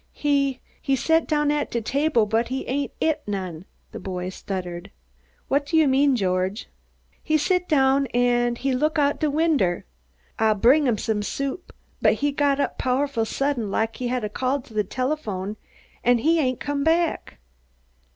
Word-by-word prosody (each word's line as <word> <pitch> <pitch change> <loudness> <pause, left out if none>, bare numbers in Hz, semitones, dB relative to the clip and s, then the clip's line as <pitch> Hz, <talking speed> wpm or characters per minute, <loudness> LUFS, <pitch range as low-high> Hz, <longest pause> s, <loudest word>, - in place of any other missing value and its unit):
"He 275 -3 0 0.2
he 275 - +1
set 320 +5 +2
down 295 -1 +1
at 295 -1 -1
de 235 - -1
table 275 0 +1
but 225 +3 0
he 260 +1 -4
ain't 280 +1 -2
eat 315 -2 +1
none," 185 -4 -4 0.3
the - - -7
boy 180 -1 -4
stuttered. 180 -2 -6 0.6
"What 285 +1 0
do 325 - +1
you 315 -2 +5
mean, 270 +1 +3
George?" 185 0 -1 0.5
"He 310 - +1
sit 360 +4 0
down 275 -2 +3
an' 240 0 +1
look 285 +4 +1
out 290 -1 +2
de 310 - +1
winder. 285 - +1 0.5
Ah 220 -1 +3
brung 265 +8 +4
him 235 -3 +2
some 210 0 -1
soup 275 - -4 0.3
but - - +5
he 290 0 0
got 280 0 +1
up - - -1
powful 255 -2 0
sudden, 260 -2 -1
lak 220 +3 -1
he 250 - -3
had 250 -1 -1
a 210 - -2
call 260 +6 -1
to 245 -3 -17
de 215 -1 +1
telephome, 215 -4 -3 0.5
an' 245 0 +4
he 325 +7 +2
ain't 255 -4 0
come 285 -1 -2
back." 330 +1 0
265 Hz, 170 wpm, -24 LUFS, 220-290 Hz, 0.6 s, you